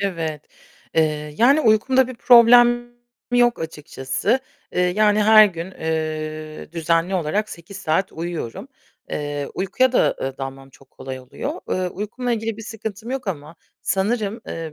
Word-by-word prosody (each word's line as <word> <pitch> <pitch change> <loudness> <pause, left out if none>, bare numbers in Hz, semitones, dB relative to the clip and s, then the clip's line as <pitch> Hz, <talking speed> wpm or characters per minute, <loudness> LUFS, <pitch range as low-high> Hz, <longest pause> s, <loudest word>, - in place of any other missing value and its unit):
Evet, 165 -6 -3 0.5
eee, 150 -2 0
yani 275 +6 +5
uykumda 250 +3 +3
bir 255 - -7
problem 240 0 +6 0.4
yok 245 -1 +3
açıkçası. 160 - -2 0.3
Eee, - - 0
yani 210 +4 +3
her 215 0 +8
gün, 175 -1 -6
eee, 155 -2 -4
düzenli 165 +2 0
olarak 185 +5 -1
8 170 +2 -10
saat 185 +1 -1
uyuyorum. 170 - -5 0.4
Eee, 145 -1 -3
uykuya 215 +7 +1
da, - - +3
eee, 135 +1 -4
dalmam 135 0 -7
çok 135 0 -21
kolay 130 -1 -8
oluyor. 125 - -6
Eee, 185 -1 -1
uykumla 225 +6 -4
ilgili 225 -1 -2
bir 225 - -9
sıkıntım 220 +1 -7
yok 265 -3 -4
ama 155 -2 -6 0.3
sanırım, 210 +3 -1
eee, 160 -2 -6
185 Hz, 145 wpm, -21 LUFS, 155-225 Hz, 0.5 s, her